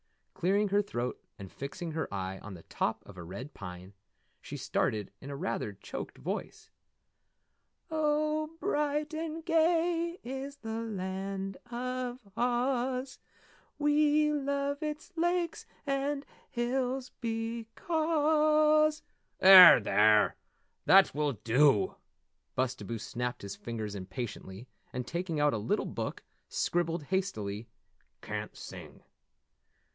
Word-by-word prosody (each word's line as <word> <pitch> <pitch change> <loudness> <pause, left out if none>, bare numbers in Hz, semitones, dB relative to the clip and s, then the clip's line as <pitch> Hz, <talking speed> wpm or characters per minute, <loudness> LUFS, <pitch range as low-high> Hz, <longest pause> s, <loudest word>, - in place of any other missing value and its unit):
Clearing 200 +3 +1
her 200 +1 +3
throat 125 -11 -4
and 100 -4 -9
fixing 160 +5 -6
her 160 0 -3
eye 95 -1 -4
on 100 -2 -9
the 85 - -12
top - - -2
of 100 - -12
a 90 - -8
red 120 - -8
pine, 90 0 -9 0.5
she - - -7
started 105 -2 -1
in 140 - -7
rather 145 +7 -2
a - - -11
choked - - -7
voice: - - -5 1.2
"Oh, 305 0 +1
Bright 300 -4 0
and 320 0 -4
gay 335 +1 +2
is 270 +3 -5
the 225 -4 -5
Land 195 -2 -4
of 250 0 -3 0.2
Oz 250 +2 0 0.6
We 300 0 +3
love 280 0 -1
its 305 +4 -4
lakes 345 0 0 0.2
and 275 0 -1 0.2
hills 255 +1 -1
becoz 305 +7 +2 0.2
" - - -47
"There, 185 -5 +11
there! 105 0 +4 0.5
That 195 0 +7
will 145 -1 0
dew!" 120 +1 +3 0.6
Bustabo 120 -3 -1
snapped 125 +2 -4
his 100 -1 -5
fingers 110 -3 -5
impatiently, 100 +2 -6 0.2
and 125 -1 -4
taking 170 +1 -3
out 145 0 +3
a 110 - -1
little 105 - 0
book - - -4 0.3
scribbled 170 -2 0
hastily: 115 - -2 0.5
"Can't - - -5
sing." - - -10
225 Hz, 115 wpm, -31 LUFS, -, 1.2 s, There